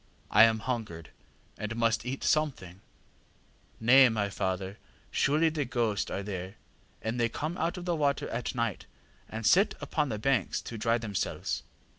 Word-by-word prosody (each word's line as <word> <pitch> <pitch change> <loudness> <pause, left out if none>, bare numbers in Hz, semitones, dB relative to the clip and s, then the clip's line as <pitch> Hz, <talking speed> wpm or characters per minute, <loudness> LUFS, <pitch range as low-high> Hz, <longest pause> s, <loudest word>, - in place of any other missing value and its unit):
I 105 +2 +8
am 110 -1 +1
hungered, 105 -9 -4 0.5
and 110 +1 -3
must 115 0 +1
eat 135 +2 -4
something. 100 - 0 1.0
ŌĆÖ 110 - -7 0.2
ŌĆ£ŌĆśNay, - - 0
my 105 -2 0
father; 95 +1 -3 0.3
surely 155 +4 +3
the 155 -2 -1
ghosts 120 -5 -1
are 100 - -3
there; 95 -1 -5 0.5
they 115 +1 0
come 155 +8 -3
out 170 +1 -1
of 180 - -6
the 175 -1 0
water 145 -3 0
at 120 +2 -3
night, 115 -5 -2 0.4
and 110 0 -5
sit 195 - +4
upon 150 -3 -1
the 110 - -2
banks 125 -3 +1
to 115 - -7
dry 115 +2 +2
themselves. 110 -4 -3
115 Hz, 160 wpm, -29 LUFS, 105-140 Hz, 1.0 s, I